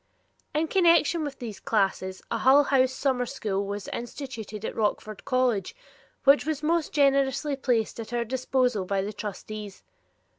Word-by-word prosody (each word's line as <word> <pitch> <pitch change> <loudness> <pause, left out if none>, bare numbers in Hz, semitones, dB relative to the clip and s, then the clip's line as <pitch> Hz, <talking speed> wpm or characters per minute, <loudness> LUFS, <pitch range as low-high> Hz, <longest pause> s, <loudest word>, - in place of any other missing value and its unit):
In 315 +2 +1
connection 335 -2 +4
with 285 -2 -5
these 225 -6 -7
classes 190 -3 -1
a 230 - 0
Hull 270 +5 +6
House 260 -2 +3
summer 260 -2 0
school 200 -7 -2
was 205 0 -5
instituted 230 -4 -6
at - - -4
Rockford 215 -1 -2
College, 255 - 0 0.5
which 280 +1 +6
was 305 -1 -3
most 330 0 +1
generously 275 0 +2
placed 240 -5 0
at 225 0 -7
our 240 -1 -1
disposal 250 -3 0
by 195 +1 -1
the 210 +2 -4
trustees. 210 0 -7
250 Hz, 150 wpm, -26 LUFS, 215-275 Hz, 0.5 s, Hull